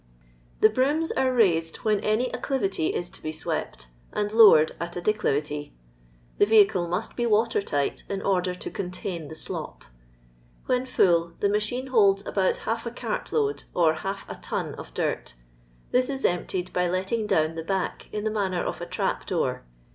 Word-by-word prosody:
The 215 - +8
brooms 285 +8 +1
are 260 -1 +1
raised 170 -9 +2
when 210 -2 +3
any 215 +5 0
acclivity 195 - -1
is 175 - -1
to - - -8
be 155 - -3
swept, - - -4 0.2
and 205 0 -1
lowered 210 -9 +7
at 170 0 -4
a - - -2
declivity. 150 -7 -1 0.6
The 205 - +5
vehicle 205 -5 +5
mu^it 180 +6 -3
be 240 -1 0
water 225 0 +2
tight, 145 -7 -1
in 200 - -2
order 185 -2 +1
to - - -7
contain 180 -3 -4
the 160 - -9
slop. - - -6 0.8
When 255 0 0
full 170 -7 +3
the 200 - +2
machine 215 +5 -1
holds 200 -3 +4
about 190 -2 +1
half 230 +1 -2
a - - -3
cart 240 - -4
load 430 -2 0
or 165 -3 +4
half 195 +5 -5
a - - -5
ton - - -4
of - - -10
dirt; - - -2 0.6
this 255 +1 +2
is 270 -1 -2
emptied 180 +1 -1
by 180 0 +1
letting 190 +5 -1
down 160 -5 +2
the 165 0 -5
back 190 +2 -3
in 210 -1 -3
the 220 - 0
manner 190 -4 -1
of - - -4
a - - -5
trap - - -2
door. - - -1
195 Hz, 180 wpm, -26 LUFS, 175-225 Hz, 0.8 s, The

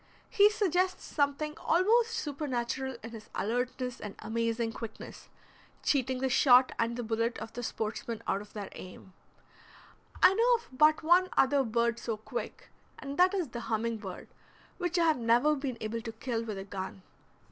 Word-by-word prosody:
He 415 -2 +6
suggests 370 -3 0
something 295 +1 -1
almost 450 +7 +3
supernatural 265 - -3
in 225 - -7
his 220 -2 -10
alertness 250 +2 -2
and 205 -2 -7
amazing 230 0 -1
quickness, 225 -1 -9 0.5
cheating 260 -2 +1
the 265 - +2
shot 255 0 +6
and 230 +1 0
the 245 - -3
bullet 230 +1 -1
of 225 - -8
the 245 - -5
sportsman 225 0 -4
out 195 - 0
of 210 - -14
their 205 -2 -6
aim. 185 0 -11 1.1
I 375 - +8
know 475 +4 +4
of 460 - -7
but 305 +3 +4
one 355 +3 +5
other 275 +1 +4
bird 235 0 0
so 225 -2 -3
quick, 215 - -7 0.3
and 280 +1 -7
that 370 +2 +5
is 355 -8 -1
the 235 - -6
humming 225 +1 0
bird, 190 -4 -8 0.5
which 355 0 -1
I 340 - +4
have 315 -5 +3
never 240 +6 +3
been 270 -4 -4
able 225 +1 -3
to 225 - -6
kill 230 0 -3
with 215 -3 -5
a 195 - -5
gun. 190 -1 -7
245 Hz, 170 wpm, -30 LUFS, 225-305 Hz, 1.1 s, I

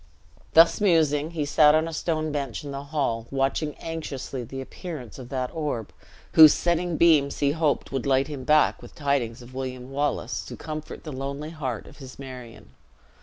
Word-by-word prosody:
Thus 165 +5 +6
musing, 155 -6 +3
he 160 -3 -2
sat 150 +1 +5
on 160 +1 +2
a 165 - -6
stone 155 -1 -1
bench 140 -1 -3
in 145 - -6
the 140 +1 -6
hall, 135 -6 -1
watching 140 +2 -1
anxiously 140 -5 -5
the 135 +3 -7
appearance 135 - -8
of 125 -2 -9
that 130 -1 -2
orb, 145 -9 -3 0.4
whose 155 -2 +9
setting 175 -1 0
beams 155 -4 +4
he 140 -1 +2
hoped 155 -1 0
would 135 -1 -2
light 135 0 +3
him 145 -4 -6
back 150 +3 +3
with - - -13
tidings 135 -5 -1
of 125 +2 -14
William 130 0 -5
Wallace 145 +1 -1
to - - -7
comfort 155 0 -7
the 155 - -6
lonely 140 +3 -5
heart 130 -9 -4
of 140 - -14
his 130 -3 -11
Marion. 125 -4 -10
145 Hz, 180 wpm, -25 LUFS, 130-155 Hz, 0.4 s, whose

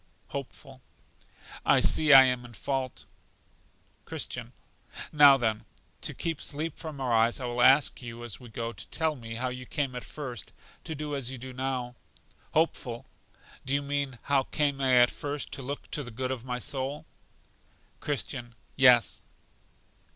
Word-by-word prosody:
Hopeful. 135 -1 -8 0.8
I - - +5
see 155 -1 +5
I 135 -1 +11
am 125 -1 +1
in 120 -1 -12
fault. 130 +4 -3 1.0
Christian. - - -5 0.6
Now 145 -2 +8
then, 110 -4 -1 0.4
to - - -3
keep 165 -3 -3
sleep 155 +2 -4
from 155 -4 -7
our 130 -3 0
eyes 115 +2 +3
I 130 - -4
will 120 0 -1
ask 135 +3 +5
you, 120 -1 -8
as 110 -5 -3
we 125 - -12
go, 115 +1 -4
to - - -9
tell 160 -1 -1
me 115 -3 -8
how 130 +2 -1
you 125 0 -7
came 140 -4 -2
at 125 - -5
first 125 - -7 0.3
to 160 - -4
do 150 0 -4
as 135 -3 -1
you 130 - -6
do 130 +1 -8
now? 130 -1 -3 0.6
Hopeful. 130 -7 0 0.6
Do 135 +2 -1
you 140 - 0
mean 140 -2 -2
how 140 -1 +3
came 140 0 0
I 125 -2 +6
first 145 +3 -5
to - - -6
look 140 +3 -6
to 150 - -1
the 125 - -7
good 130 +3 -3
of 125 -3 -4
my 125 -1 -3
soul? 135 +3 -3 0.9
Christian. 125 -4 -3 0.2
Yes. 125 -4 +5
130 Hz, 165 wpm, -28 LUFS, 120-140 Hz, 1.0 s, I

